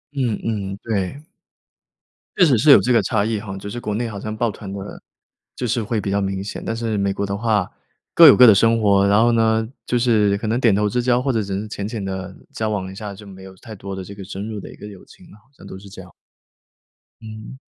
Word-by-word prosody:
嗯 125 -6 -1
嗯， 100 -3 -3
对。 110 +6 -3 1.1
确 - - +5
实 135 -7 +3
是 145 +6 +5
有 135 - +9
这 125 - 0
个 120 - +4
差 110 -5 0
异 110 -1 -1
哈， 100 -2 -7
就 100 +1 -8
是 120 - -6
国 105 -3 -4
内 115 +3 -2
好 100 - -7
像 110 +2 -5
报 115 +1 0
团 100 -1 -8
的， 100 - -6 0.8
就 125 - -3
是 115 0 -1
会 110 0 -2
比 100 - -4
较 100 - 0
明 95 -1 -3
显。 100 - -7
但 115 - -2
是 115 -2 -2
美 100 0 0
国 100 - -4
的 100 0 -3
话 110 -1 0 0.5
各 170 - +9
有 140 - +9
各 125 -1 +8
的 110 - +7
生 115 +3 +3
活。 100 -2 +3
然 100 +2 +4
后 120 - +4
呢， 110 -1 +2 0.2
就 120 - 0
是 105 -4 +2
可 110 - -4
能 115 +3 0
点 115 -5 +3
头 105 +1 +1
之 125 +4 -1
交 125 0 +2
或 135 - 0
者 110 -3 0
只 100 -1 -4
是 110 - -6
浅 100 -1 -5
浅 110 -3 -5
地 95 -1 -6 0.2
交 110 -1 -3
往 95 -3 -3
一 - - -11
下， 105 0 -7
就 105 +1 -13
没 95 -1 -12
有 95 0 -12
太 110 +2 -11
多 100 0 -7
的 95 - -6
这 100 +2 -10
个 100 - -9
深 100 +3 -7
入 105 -2 -5
的 - - -10
一 - - -13
个 105 - -11
友 100 -3 -13
情 - - -18
了， 105 - -17
好 105 - -26
像 - - -16
都 - - -9
是 100 +1 -13
这 95 -1 -11
样。 90 -1 -15 1.1
嗯。 110 +3 -10
105 Hz, 290 characters per minute, -20 LUFS, 100-115 Hz, 1.1 s, 有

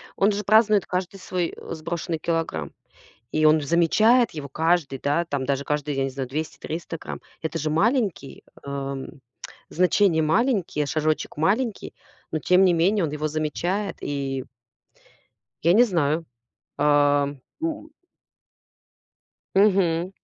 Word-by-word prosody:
Он 200 +2 +3
же 205 +1 -3
празднует 215 -1 +4
каждый 185 +1 -3
свой, 180 -2 -2
э, - - -8
сброшенный 165 +1 -4
килограмм, 160 - -2 0.6
и 155 0 +2
он 155 +1 +6
же 145 - -6
замечает 215 - +4
его 150 -3 -6
каждый, 160 -2 0
да, 145 +6 0
там 140 -4 -3
даже 140 0 -1
каждый, 150 0 -2
я 135 - 0
не 135 - -1
знаю, 130 -1 -5
200-300 160 +3 -5
грамм. - - -7 0.2
Это 160 +1 -3
же 155 - -1
маленький, 200 - 0 0.2
ам, 140 -1 -4 0.6
значение 180 -1 +3
маленькие, 180 - +1
шажочек 155 +2 -1
маленький, 210 - 0 0.4
но 155 - -1
тем 180 +4 +4
не 180 - +4
менее 185 +4 +2
он 150 - -4
его 150 +1 -2
замечает. 175 +6 -2
И 135 -2 -3 1.2
Я 170 - +4
не 235 +4 +7
знаю. 165 -6 0 0.5
Ам, 145 -1 +2 0.2
м 320 -1 -4 1.6
Мгм. 185 -4 +3
165 Hz, 135 wpm, -24 LUFS, 145-190 Hz, 1.6 s, не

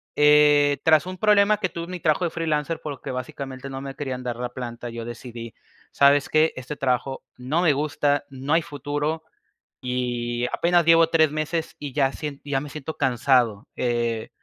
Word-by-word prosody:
eh, 150 -1 +5
tras 155 0 +4
un 185 0 -6
problema 210 0 +4
que 190 -3 -1
tuve 170 +1 -6
en 180 - -10
mi 180 - -5
trabajo 155 +2 +1
de 170 - -2
freelancer, 160 -1 -1
porque, 145 -3 -6
básicamente, 130 +1 -6
no 135 0 -6
me 135 -1 -7
querían 130 -3 -4
dar 120 -1 -3
la 125 0 -4
planta, 120 -1 -7
yo 115 0 -6
decidí: 120 -1 -8 0.4
"¿Sabes 140 0 +4
qué?, 155 +1 +3
este 130 +3 -6
trabajo 135 0 -1
no 135 +7 -1
me 160 -5 +4
gusta, 145 0 0
no 135 +3 -3
hay 165 - +4
futuro 145 +1 -3 0.6
y 120 -1 -2
apenas 175 -1 +3
llevo 165 0 +6
3 160 -3 +3
meses, 155 +2 -3
y 145 -3 -6
ya 135 -2 +2
sien 145 -3 -6
ya 140 -2 -1
me 150 - -7
siento 155 +1 -6
cansado", 125 -5 +2
eh, 120 -2 -1
145 Hz, 185 wpm, -24 LUFS, 125-155 Hz, 0.6 s, llevo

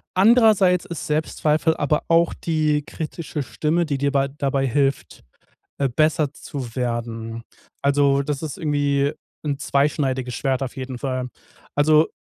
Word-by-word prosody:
andererseits 200 -4 +5
ist 170 -5 -6
Selbstzweifel 155 +1 +1
aber 150 +1 +1
auch 170 0 +3
die 155 -2 0
kritische 155 -1 -5
Stimme, 160 +6 0
die 140 -3 -2
dir 140 0 +1
bei 140 -1 +1
dabei 135 -1 -1
hilft, 135 +2 -1 0.5
äh, 135 -2 0
besser 155 -1 +2
zu 130 -6 -7
werden. 115 -2 -3 0.4
Also, 140 0 +3
das 140 0 -3
ist 155 -3 -4
irgendwie 145 -2 +1 0.3
'n 145 -2 -1
zweischneidiges 135 -3 0
Schwert 135 0 -1
auf 130 +1 -5
jeden 130 -1 -5
Fall. 130 -1 -3 0.5
Also, 155 +2 +5
145 Hz, 140 wpm, -22 LUFS, 135-155 Hz, 0.5 s, andererseits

